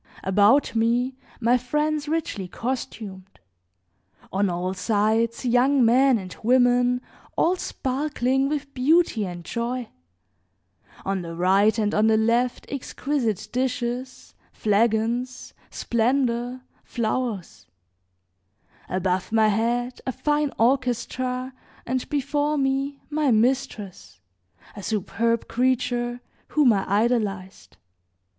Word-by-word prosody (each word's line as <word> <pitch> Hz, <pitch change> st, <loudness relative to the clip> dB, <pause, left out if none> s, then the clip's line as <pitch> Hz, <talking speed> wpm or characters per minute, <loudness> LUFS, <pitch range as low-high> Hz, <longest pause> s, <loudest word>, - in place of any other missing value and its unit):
About 205 Hz, +8 st, +4 dB
me 240 Hz, +3 st, +1 dB, 0.2 s
my 245 Hz, +1 st, +3 dB
friends 300 Hz, +4 st, -1 dB
richly 300 Hz, -, -2 dB
costumed, 210 Hz, -5 st, -6 dB, 0.9 s
on 195 Hz, +1 st, +2 dB
all 180 Hz, +1 st, -2 dB
sides 220 Hz, +5 st, 0 dB
young 250 Hz, +2 st, +4 dB
men 255 Hz, +2 st, +5 dB
and 185 Hz, -3 st, -8 dB
women, 245 Hz, +1 st, +3 dB, 0.4 s
all 355 Hz, +3 st, +3 dB
sparkling 270 Hz, -3 st, -1 dB
with 290 Hz, -2 st, -3 dB
beauty 265 Hz, -, +2 dB
and 175 Hz, -1 st, -8 dB
joy; 240 Hz, +1 st, -3 dB, 1.2 s
on 195 Hz, -1 st, -1 dB
the 165 Hz, -1 st, -7 dB
right 195 Hz, +5 st, +3 dB
and 210 Hz, -1 st, 0 dB
on 215 Hz, +1 st, +3 dB
the 220 Hz, 0 st, +4 dB
left 235 Hz, +3 st, +1 dB
exquisite 270 Hz, -5 st, -2 dB
dishes, 250 Hz, 0 st, -3 dB, 0.2 s
flagons, 230 Hz, +4 st, 0 dB, 0.2 s
splendor, 245 Hz, +1 st, 0 dB, 0.2 s
flowers; 230 Hz, -4 st, -3 dB, 1.2 s
above 185 Hz, 0 st, -1 dB
my 220 Hz, -1 st, +4 dB
head 240 Hz, +4 st, -1 dB
a -, -, +1 dB
fine 295 Hz, +2 st, 0 dB
orchestra, 255 Hz, +1 st, 0 dB, 0.3 s
and 255 Hz, +1 st, -2 dB
before 290 Hz, +1 st, 0 dB
me 275 Hz, +1 st, -1 dB
my 300 Hz, -1 st, +1 dB
mistress, 220 Hz, -, -1 dB, 0.6 s
a 205 Hz, -, -7 dB
superb 230 Hz, +3 st, -1 dB
creature, 245 Hz, 0 st, 0 dB, 0.3 s
whom 285 Hz, -6 st, +4 dB
I 195 Hz, -1 st, -2 dB
idolized. 205 Hz, -3 st, -1 dB
240 Hz, 100 wpm, -24 LUFS, 215-260 Hz, 1.2 s, men